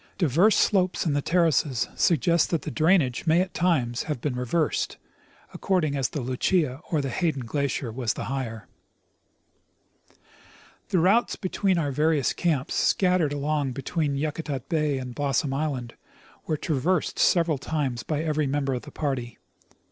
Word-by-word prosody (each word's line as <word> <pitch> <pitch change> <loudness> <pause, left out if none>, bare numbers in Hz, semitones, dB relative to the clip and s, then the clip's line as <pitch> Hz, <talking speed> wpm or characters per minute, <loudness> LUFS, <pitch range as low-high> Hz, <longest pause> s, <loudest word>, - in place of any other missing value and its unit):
Diverse 175 - +4
slopes 185 -4 +2
in 155 - +1
the 145 - +1
terraces 155 -7 +1
suggest 170 0 +2
that 165 - -1
the - - -4
drainage 160 -5 +2
may 160 +2 +4
at 185 0 -1
times 135 -10 +1
have 150 - -2
been 130 +1 -2
reversed, 125 +6 -1 0.5
ac - - -11
cording 175 -7 +1
as 135 -3 0
the 150 - -4
Lucia 130 +3 0
or 155 -3 +1
the 135 -2 -3
Hayden 155 -5 -1
glacier 140 -1 -2
was 120 -1 -2
the - - -4
higher. 125 -5 -4 2.2
The - - +1
routes 195 +8 +3
between 190 -1 0
our 145 -4 0
various 150 0 +1
camps, 155 -5 -1
scattered 180 -5 +2
along 145 -2 -1
between 140 +2 -2
Yakutat 145 -3 -3
bay 150 -4 +1
and 125 -1 -6
Blossom 140 0 0
islancl, 135 -4 -2 0.6
were 155 - 0
traversed 160 +5 -1
several 165 -5 +3
times 135 -6 -2
by 155 0 -2
every 155 -2 0
member 135 0 -1
of 125 - -3
the - - -11
party. 130 -6 -3
150 Hz, 155 wpm, -25 LUFS, 130-165 Hz, 2.2 s, Diverse